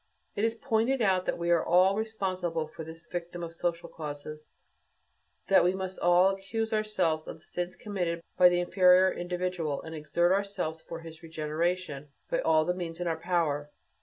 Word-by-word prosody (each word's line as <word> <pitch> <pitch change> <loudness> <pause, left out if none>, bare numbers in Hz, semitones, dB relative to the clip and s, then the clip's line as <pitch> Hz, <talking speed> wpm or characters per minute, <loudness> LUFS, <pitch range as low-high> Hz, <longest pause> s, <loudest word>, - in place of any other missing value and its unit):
It 205 - -1
has 225 0 +2
pointed 230 +2 +1
out 185 -2 +2
that - - -1
we 170 0 0
are 170 -1 +4
all 185 +3 +4
responsible 185 -7 -2
for 160 - -9
this 160 +1 -10
victim 175 0 -5
of 165 0 -6
social 170 0 -2
causes, 150 -1 -8 1.0
that - - +6
we 180 +2 +2
must 190 0 -5
all 175 +2 +5
accuse 220 +4 -3
ourselves 185 -8 0
of - - -7
the - - -25
sins 175 +1 -4
committed 180 -5 -2 0.2
by 180 - +7
the 175 0 +1
inferior 185 +1 +5
individual, 175 -4 -2
and 160 - -8
exert 170 +3 +1
ourselves 190 -5 -1
for 165 0 -8
his 165 0 -11
regeneration 160 -1 -2 0.2
by - - +2
all 155 -1 +3
the 180 - +1
means 170 -2 -5
in 175 - -2
our 165 -1 0
power. 160 -5 0
175 Hz, 180 wpm, -29 LUFS, 165-190 Hz, 1.0 s, by